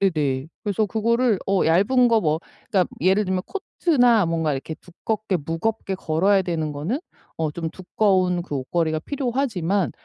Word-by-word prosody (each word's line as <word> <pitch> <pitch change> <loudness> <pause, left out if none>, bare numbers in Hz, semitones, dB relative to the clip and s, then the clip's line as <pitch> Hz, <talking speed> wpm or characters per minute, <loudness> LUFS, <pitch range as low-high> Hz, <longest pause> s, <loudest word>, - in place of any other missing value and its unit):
네네 150 -8 0 0.2
그래서 210 0 0
그거를 230 +1 +1
어 195 -1 +2
얇은 205 +10 +4
거 230 -2 +4
뭐 155 -2 +1 0.3
그러니까 190 -5 +3
예를 190 +4 +3
들면 185 -1 -1
코트나 245 - +2
뭔가 165 -2 0
이렇게 140 +4 -4
두껍게 195 +3 -3
무겁게 195 +4 -2
걸어야 190 +3 +2
되는 160 -4 -2
거는 165 - -2 0.4
어 160 -1 0
좀 160 +1 -4
두꺼운 185 -2 +1
그 150 -5 -4
옷걸이가 155 +4 -1
필요하지만 220 - -1
185 Hz, 340 characters per minute, -23 LUFS, 160-220 Hz, 0.4 s, 얇은